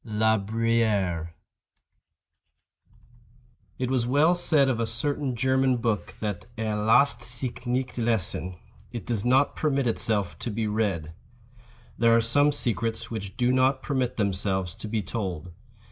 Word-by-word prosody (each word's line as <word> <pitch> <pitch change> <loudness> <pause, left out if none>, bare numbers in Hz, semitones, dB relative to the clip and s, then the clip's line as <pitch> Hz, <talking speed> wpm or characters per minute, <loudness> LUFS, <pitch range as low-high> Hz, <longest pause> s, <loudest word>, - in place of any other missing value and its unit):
—La 110 0 +2
Bruyère. 105 -5 0 2.5
It 130 0 -2
was 125 -3 +1
well 145 +7 +4
said 160 -5 +3
of 125 -3 0
a 115 - 0
certain 135 +3 -2
German 130 +1 +2
book 115 -3 -2
that 100 -4 -4
"er 110 -1 -2
lasst 110 +7 +3
sich 125 0 -6
nicht 125 0 -2
lesen"—it 105 0 -3
does 115 -4 -2
not 130 +3 +3
permit 140 -3 0
itself 110 -4 0
to - - -4
be 110 +1 -2
read. 100 -7 -1 0.9
There 115 -1 +5
are - - +5
some 145 +6 +3
secrets 115 -3 -1
which 100 -4 -6
do 125 -1 +2
not 130 +1 +2
permit 130 -3 -1
themselves 95 -3 0
to - - -7
be 105 -1 -2
told. 90 -6 -4
115 Hz, 135 wpm, -26 LUFS, 105-130 Hz, 2.5 s, There